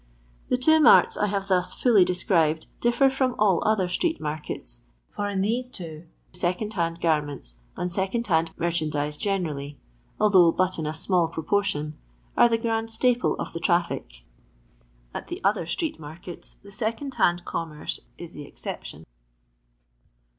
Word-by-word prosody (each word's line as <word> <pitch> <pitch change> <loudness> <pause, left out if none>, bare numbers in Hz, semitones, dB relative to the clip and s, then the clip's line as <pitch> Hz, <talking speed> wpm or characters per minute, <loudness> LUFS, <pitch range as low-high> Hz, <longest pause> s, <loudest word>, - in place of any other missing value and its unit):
The 250 - +3
two 315 +5 +5
maru 305 - +8 0.2
I 210 - +3
have 195 -1 -2
thus 180 -1 +1
fully 225 -7 +5
described 165 -3 +1
differ 240 +3 +3
from 265 -2 +1
all 200 -5 +3
other 215 -4 +2
street 320 - 0
markets, 150 - -5 0.3
for 205 0 -1
in 195 -1 -1
these 240 +5 0
two 165 -6 -8
| - - -38
second 180 +4 -1
hand 170 -3 -1
garments, 145 - -1 0.2
and 180 - -2
second 195 +6 -1
hand 165 -4 +2
merchan 170 -2 0
dize 150 0 -2
generally 150 -7 -2 0.4
(although 190 -5 +6
but 185 0 0
in 155 - -2
a 155 - -2
small 175 +1 +2
proportion), 160 -2 -1 0.4
are 240 - +6
the 230 - +2
grand 225 0 -1
staple 245 +2 +2
of - - -5
the 165 - -4
traffic. 165 - -1 0.9
At - - -6
the - - -5
other 195 -4 +1
street 310 - -2
markets^ 165 +3 -9
the 200 - -13
aecond 225 +7 -3
hand 175 0 +2
commerce 155 -2 -4 0.2
if 170 -1 -9
the 145 - -8
exception. - - -8
180 Hz, 155 wpm, -26 LUFS, 160-215 Hz, 0.9 s, maru